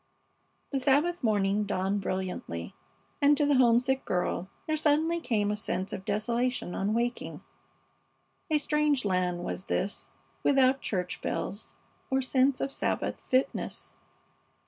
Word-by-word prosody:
The 275 - 0
Sabbath 290 +6 +2
morning 205 -2 +2
dawned 195 0 0
brilliantly, 185 - -4 0.5
and 290 0 +5
to 295 - +3
the 290 - +3
homesick 255 +2 +4
girl 180 0 -1 0.2
there 310 - 0
suddenly 310 +2 +2
came 210 -9 0
a - - 0
sense 195 -2 -3
of 190 - -6
desolation 235 -1 -1
on 205 +3 0
waking. 240 +1 -2 1.1
A 310 - +4
strange 295 -3 +1
land 180 -2 0
was 185 - -4
this, 200 - -2 0.3
without 270 -1 +4
church 180 -3 -2
bells 200 +3 -4 0.3
or 265 -1 +2
sense 260 0 +2
of 275 - -1
Sabbath - - -1
fitness. 260 +1 -1
240 Hz, 130 wpm, -29 LUFS, 195-275 Hz, 1.1 s, and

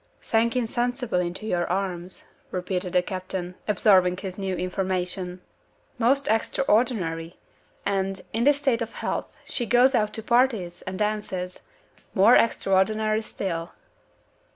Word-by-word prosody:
"Sank 230 +2 +1
insensible 245 -3 0
into 180 +4 -3
your 175 -5 0
arms," 185 -1 -3 0.3
repeated 180 0 -3
the 180 -1 +4
captain, 185 -1 -4
absorbing 185 -3 +4
his 190 -1 -6
new 190 -1 -2
information. 185 0 -2 0.6
"Most 275 +4 +2
extraordinary! 210 -8 +1 0.5
And 195 -1 -1
in 225 +2 +1
this 290 0 +5
state 265 -5 +1
of 230 - -4
health - - -3 0.2
she 240 -3 -1
goes 250 +3 +5
out 215 -4 +2
to 220 - -6
parties, 235 -7 +1
and 185 0 -4
dances. 205 -4 -2 0.6
More 205 +6 +7
extraordinary 215 +1 +2
still!" 175 -6 -4
195 Hz, 125 wpm, -25 LUFS, 180-230 Hz, 0.6 s, More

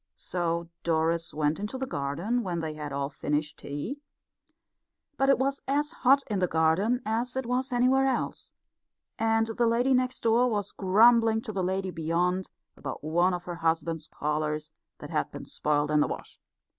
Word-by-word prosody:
So 170 -1 -2
Doris 165 0 0
went 150 +2 0
into 210 +6 -4
the 265 - -2
garden 170 - -1
when 180 -5 -3
they 160 -1 -3
had 150 -1 -6
all 140 0 -1
finished 150 +1 -2
tea, 145 - -5 1.2
but 270 -1 +2
it 275 - +6
was 275 +1 -1
as 295 +3 +1
hot 275 -3 +4
in 205 -3 -2
the 180 - +2
garden 165 +10 +2
as 235 +4 -1
it 265 -1 -2
was 255 +2 -1
anywhere 255 +2 +3
else; 265 - -2 0.7
and 225 0 +3
the 230 +1 0
lady 245 +3 +3
next 255 0 0
door 235 +2 +4
was 205 -3 -2
grumbling 225 +3 +4
to - - -5
the 195 -2 -2
lady 190 +1 -1
beyond 175 +3 0 0.3
about 135 0 -6
one 175 +4 +2
of 175 - -6
her 175 -1 -6
husband's 165 -1 -1
collars 150 +1 -2 0.3
that - - -9
had - - 0
been - - -8
spoilt 150 0 0
in 150 - +4
the 150 - +3
wash. - - -7
185 Hz, 175 wpm, -28 LUFS, 160-245 Hz, 1.2 s, it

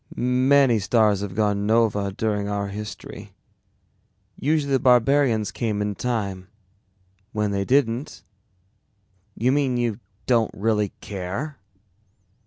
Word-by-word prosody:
"Many 130 0 +3
stars 105 0 +2
have 100 -2 -5
gone 105 -1 0
nova 105 -3 +2
during 105 0 -2
our 100 -1 -2
history. 105 +1 -8 1.0
Usually 145 -1 0
the 135 - +3
barbarians 125 -3 +3
came 110 -4 -2
in 105 0 -1
time. 100 -5 -3 0.9
When 105 -1 0
they 100 0 -1
didn't 130 0 0 0.6
" 100 -1 -43
"You 125 +3 +2
mean 135 -3 +1
you 120 -3 -1 0.3
don't 115 -3 +2
really 105 -1 0
care?" 100 +10 -5
110 Hz, 115 wpm, -23 LUFS, 100-125 Hz, 1.0 s, Many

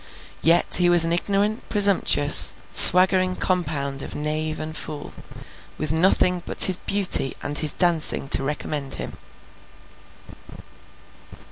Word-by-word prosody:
Yet 170 +1 0
he 175 0 0
was 175 -1 +2
an 165 - -4
ignorant 200 +4 -5
presumptuous, 195 -8 +3 0.2
swaggering 185 0 +5
compound 145 -8 -6
of - - -11
knave 155 +1 -5
and 155 0 -9
fool, 150 -2 -10 0.6
with 155 0 -5
nothing 180 +2 -2
but - - +4
his 185 -2 +5
beauty 190 -10 -1
and 145 0 -3
his 155 -2 +2
dancing 170 -5 -3
to - - +6
recommend 145 0 -7
him. - - -9
165 Hz, 120 wpm, -19 LUFS, 150-185 Hz, 0.6 s, to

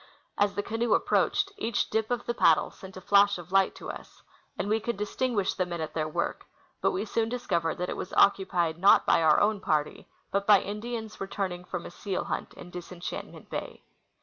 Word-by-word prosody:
As 205 0 +2
the 205 - -1
canoe 225 +1 +1
approached, 395 - +1
each 230 - -1
dip 220 0 0
of 245 -1 -2
the 240 - -1
paddle 165 -8 +4
sent 190 0 -12
a - - -8
flash 200 +1 +4
of 175 0 -11
light 195 0 +3
to - - -6
us, - - -13 0.3
and - - -2
we 215 +2 +2
could 235 -1 -3
distinguish 210 0 -1
the 185 - 0
men 175 -1 -5
at 160 -1 -4
their 155 -1 -1
work; 155 - -3 0.3
but - - +3
we 195 +3 -2
soon 225 +1 0
discovered 175 -9 -1
that 180 0 -2
it - - -3
was - - -5
occu23ied 175 -5 +3
not 195 +3 +6
by - - +4
our 155 -1 +5
own 210 0 +2
party 150 -5 -1 0.2
but 200 0 -1
by 205 -2 +8
Indians 220 +2 -5
returning 190 -2 -3
from 175 -1 -5
a - - -8
seal 190 +1 -3
hunt - - -4
in 180 - -11
Disenchantment 180 0 -7
bay. - - -6
195 Hz, 205 wpm, -28 LUFS, 175-215 Hz, 0.3 s, by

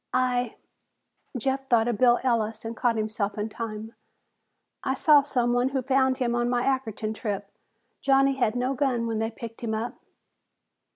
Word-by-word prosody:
"I 250 -2 +1 0.4
" - - -14
Jeff 270 +2 -2
thought 230 -1 +4
of 235 -4 -1
Bill 245 -1 +5
Ellis 225 -3 0
and 225 +1 -4
caught 235 0 +1
himself 215 -1 -2
in 210 +1 -2
time. 220 0 -6 0.9
"I 265 - 0
saw 295 +1 +6
someone 245 -2 +1
who 265 -1 -2
found 260 0 +2
him 240 -2 0
on 240 0 +1
my 245 0 +1
Ackerton 225 -5 -1
trip. 205 -3 -4 0.5
Johnny 275 0 +4
had 245 -4 0
no 250 +2 0
gun 260 -4 0
when 225 -1 -1
they 225 0 0
picked 230 0 -9
him 220 -2 -2
up." 225 +3 -4
240 Hz, 170 wpm, -26 LUFS, 220-260 Hz, 0.9 s, saw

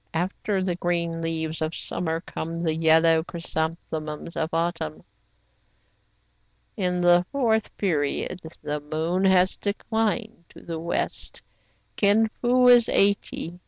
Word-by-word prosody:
After 190 +3 -1
the 185 -1 0
green 170 -1 -1
leaves 160 -1 -3
of 155 +1 -2
summer 165 -1 -3
come 165 -1 -5
the 160 -2 +1
yellow 160 0 +4
chrysanthemums 160 -2 -4
of 160 -1 -1
autumn. 165 -2 -2 1.7
"In 180 -3 -1
the 175 0 +5
fourth 225 -6 0
period 170 0 -1 0.2
the 150 0 -2
moon 160 +5 -1
has 185 -1 +4
declined 220 -1 -2
to - - -14
the 165 -1 -5
west. 170 +1 -3 0.5
Kin 215 +2 +4
Fo 250 +1 +4
is 240 -2 +6
eighty. 195 -3 +1
170 Hz, 120 wpm, -25 LUFS, 160-200 Hz, 1.7 s, is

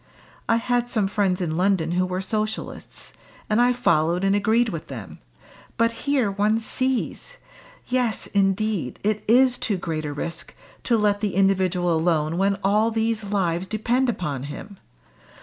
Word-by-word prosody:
I 230 - +5
had 245 +1 0
some 215 -5 +1
friends 195 -2 0
in 160 -2 -2
London 180 -3 +1
who 185 +1 +1
were 185 +1 -3
Socialists, 215 +2 -4 0.4
and 215 +3 +4
I 245 +1 +4
followed 175 -8 +1
and 195 +1 +3
agreed 220 +3 +2
with 165 -6 -6
them, 115 -9 -9 0.6
but 230 0 +3
here 255 -2 0
one 205 +3 +1
sees! 260 - -2 0.5
Yes, 250 -4 0
indeed! 195 - 0
it 210 0 0
is 250 +2 +4
too 205 - -1
great 160 -3 -4
a 145 - -3
risk 165 +4 -6 0.3
to 235 - +3
let 205 -1 +1
the 205 -4 -1
individual 185 -2 +2
alone 160 0 +1
when 195 0 +2
all 210 +3 +3
these 225 -1 -1
lives 190 -3 -1
depend 240 +5 0
upon 145 - -3
him. 200 +6 -9
200 Hz, 155 wpm, -23 LUFS, 180-225 Hz, 0.6 s, I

